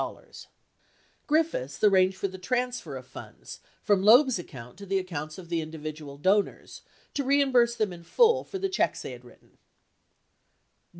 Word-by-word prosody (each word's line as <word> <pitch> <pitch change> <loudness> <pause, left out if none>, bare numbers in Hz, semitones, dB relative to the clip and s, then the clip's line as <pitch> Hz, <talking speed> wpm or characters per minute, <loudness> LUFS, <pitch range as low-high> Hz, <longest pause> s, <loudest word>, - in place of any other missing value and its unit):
104 - - -10 0.8
Griffiths 300 - 0
arranged 190 -2 +4
for 195 - -1
the 190 0 -10
transfer 245 - -2
of 130 - -10
funds 130 - -11 0.2
from 205 -2 +3
Loeb's 240 +2 +6
account 125 -8 -10
to 200 - -9
the 195 +1 +1
accounts 155 -5 -5
of 180 -2 -10
the 165 -1 -1
individual 155 -2 -8
donors 195 +7 0 0.3
to 280 - -1
reimburse 260 -4 +3
them 215 -5 -1
in 170 - -11
full 465 - +3
for 385 - -6
the 390 +1 -1
checks 380 - -1
they - - -6
had - - -11
written. - - -20
190 Hz, 160 wpm, -27 LUFS, 160-250 Hz, 0.8 s, Loeb's